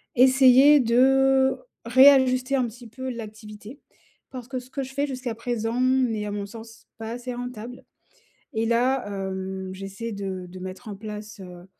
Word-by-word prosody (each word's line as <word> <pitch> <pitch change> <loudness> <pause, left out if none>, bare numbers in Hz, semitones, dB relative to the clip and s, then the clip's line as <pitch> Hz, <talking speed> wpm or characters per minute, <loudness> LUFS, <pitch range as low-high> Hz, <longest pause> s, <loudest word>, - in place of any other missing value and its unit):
essayer 265 +3 +6
de 265 +2 +4 0.3
réajuster 260 +1 +5
un 255 -2 +1
petit 235 +1 -12
peu 260 +3 -7
l'activité. 215 +1 -9 0.5
Parce 250 -3 -8
que 260 -2 -3
ce 250 +1 -15
que 275 +1 -4
je 265 0 -9
fais 285 +2 -1
jusqu'à 255 -3 -4
présent 230 0 -3
n'est, 255 -4 +1
à 205 - -4
mon 205 -1 -4
sens, 225 +2 -12
pas 225 0 -6
assez 245 +1 -6
rentable 245 0 -8 0.7
et 220 0 0
là, 245 +1 +1
heu, 190 -1 -5
j'essaie 195 +4 -7
de 190 -2 -5
de 180 +1 -11
mettre 185 +5 -8
en 205 - -6
place, 210 +1 -8
heu, 180 -1 -11
235 Hz, 165 wpm, -24 LUFS, 210-260 Hz, 0.7 s, essayer